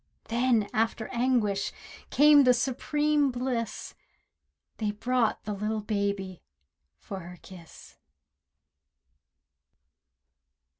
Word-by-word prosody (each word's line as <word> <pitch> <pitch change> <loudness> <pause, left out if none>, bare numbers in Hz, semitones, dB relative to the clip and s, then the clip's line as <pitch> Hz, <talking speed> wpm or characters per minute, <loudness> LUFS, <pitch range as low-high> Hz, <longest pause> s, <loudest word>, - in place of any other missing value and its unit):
Then, 235 -3 +2
after 225 -1 -1
anguish, 235 -5 0 0.4
came 295 0 +6
the 250 -1 +5
supreme 295 +3 +1
bliss— 245 -3 -3 0.8
They 215 - -1
brought 230 +2 0
the 210 - -4
little 215 +2 -2
baby, 200 -3 -2 0.6
for 190 - -8
her 180 0 -10
kiss! 175 -4 -14
225 Hz, 85 wpm, -28 LUFS, 200-255 Hz, 0.8 s, came